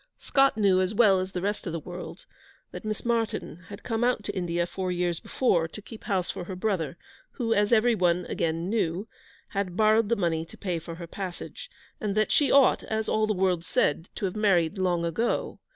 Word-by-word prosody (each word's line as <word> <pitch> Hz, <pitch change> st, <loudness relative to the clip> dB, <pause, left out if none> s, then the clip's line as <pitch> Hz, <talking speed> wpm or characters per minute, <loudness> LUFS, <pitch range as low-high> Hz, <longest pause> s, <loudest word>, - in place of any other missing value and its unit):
Scott 275 Hz, -3 st, +2 dB
knew, 200 Hz, -3 st, +4 dB
too, -, -, +3 dB
as 185 Hz, +3 st, -1 dB
well 200 Hz, -4 st, +5 dB
as 185 Hz, +1 st, -3 dB
the 180 Hz, -1 st, -4 dB
rest 205 Hz, -1 st, -2 dB
of 170 Hz, -, -3 dB
the 165 Hz, -, -2 dB
world, 175 Hz, +3 st, -8 dB, 0.5 s
that -, -, -8 dB
Miss 215 Hz, +1 st, -4 dB
Martyn 225 Hz, -6 st, -2 dB
had 200 Hz, -, -9 dB
come 225 Hz, -1 st, -1 dB
out 245 Hz, -3 st, +1 dB
to -, -, -4 dB
India 175 Hz, -2 st, 0 dB
four 185 Hz, +1 st, -3 dB
years 175 Hz, -2 st, 0 dB
before, 175 Hz, -11 st, +1 dB
to 165 Hz, -, -10 dB
keep 215 Hz, +1 st, -11 dB
house 185 Hz, -3 st, 0 dB
for 175 Hz, -, -6 dB
her 185 Hz, -, -6 dB
brother, 180 Hz, -5 st, -1 dB, 0.4 s
who, 230 Hz, -3 st, 0 dB
as 205 Hz, +1 st, +2 dB
everyone, 195 Hz, -7 st, +3 dB
again, 165 Hz, +1 st, -1 dB
knew, 195 Hz, -2 st, -1 dB, 0.4 s
had 195 Hz, -2 st, -3 dB
borrowed 215 Hz, 0 st, +4 dB
the 235 Hz, -, +3 dB
money 170 Hz, -5 st, 0 dB
to 165 Hz, -, -14 dB
pay 180 Hz, -4 st, -2 dB
for 165 Hz, +1 st, -8 dB
her 170 Hz, 0 st, -7 dB
passage, 180 Hz, +1 st, -7 dB, 0.3 s
and 205 Hz, -2 st, -2 dB
that 215 Hz, -, +2 dB
she 290 Hz, -, +3 dB
ought, 275 Hz, -2 st, +5 dB
as 220 Hz, 0 st, -2 dB
all 215 Hz, 0 st, +2 dB
the 215 Hz, -, +1 dB
world 180 Hz, -2 st, +1 dB
said, 165 Hz, 0 st, 0 dB
to -, -, -2 dB
have 185 Hz, -, -3 dB
married 190 Hz, -4 st, +2 dB
long 175 Hz, -2 st, +1 dB
ago. 195 Hz, +9 st, -1 dB
190 Hz, 215 wpm, -27 LUFS, 175-215 Hz, 0.5 s, well